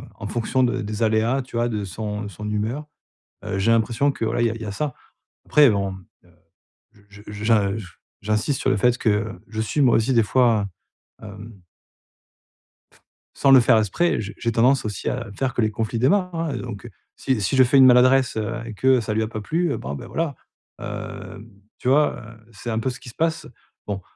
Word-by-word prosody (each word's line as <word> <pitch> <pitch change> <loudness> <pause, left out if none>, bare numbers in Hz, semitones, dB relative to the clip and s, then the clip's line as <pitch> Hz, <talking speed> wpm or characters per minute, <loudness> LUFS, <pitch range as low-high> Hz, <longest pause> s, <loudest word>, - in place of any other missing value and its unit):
en 100 - -7
fonction 120 +4 0
de 125 0 0
des 110 +1 -3
aléas, 110 +4 +2
tu 125 -2 -7
vois? 120 0 +1
De 105 -3 -3
son 105 +1 -5
de - - -5
son 105 +3 -7
humeur. 110 +8 -2 0.6
Heu, 95 - -3
j'ai 100 +4 +2
l'impression 115 +5 +2
que 115 - -4
voilà 120 - 0
il - - +3
y - - +1
a - - -4
il 115 - -9
y - - -5
a 100 - -4
ça. 145 +5 -3 0.5
Après 150 -3 +6
bon, 100 -2 -1 0.3
heu, - - -23 0.8
je 100 +1 -15
je 105 0 -7 0.3
je 110 -4 -7 0.3
j'insiste 110 +6 -1
sur - - +1
le - - +2
fait 125 +4 +2
que 105 -1 +1 0.2
je 110 -1 -5
suis 110 +7 -1
moi 130 -4 +5
aussi 115 +4 +1
des 115 -3 +4
fois 115 -2 +2 0.6
heu, - - -8
hem 105 0 -11 1.8
sans 135 - +3
le 135 - +9
faire 120 -1 +4
exprès, 110 - +1
heu, - - -2
j'ai 105 -1 -6
j'ai 115 - -1
tendance 125 +4 +3
aussi 105 -3 -3
à 120 -4 -4
faire 130 -2 -1
que - - +1
les 110 -1 +1
conflits 110 +1 -3
démarrent 180 - +2
hein. 165 -3 -2
Et 125 - -4
donc 120 -3 -7
heu, - - -8 0.3
si 130 -5 -1
si 100 +7 0
je 130 - +7
fais 125 +3 +3
une 135 - +8
maladresse, 130 0 +5
heu, 110 +1 -2
et 115 - -7
que 130 +4 +3
ça 110 -1 -3
lui 110 - +1
a - - -2
pas 110 -1 -6
plu, 165 +8 -1
heu, - - -3
bon 70 +2 -5
ben - - -8
voilà, 160 -4 -2 0.4
hem, 110 +3 -8 0.3
tu - - -6
vois? 150 +3 +3
Heu, 110 0 -13
c'est 115 +3 -8
un 110 - -1
peu 115 - -1
ce 125 - -10
qui 125 - -11
se 115 - -15
passe. 165 0 -1 0.4
Bon, 100 -2 -3
115 Hz, 230 wpm, -22 LUFS, 105-130 Hz, 1.8 s, le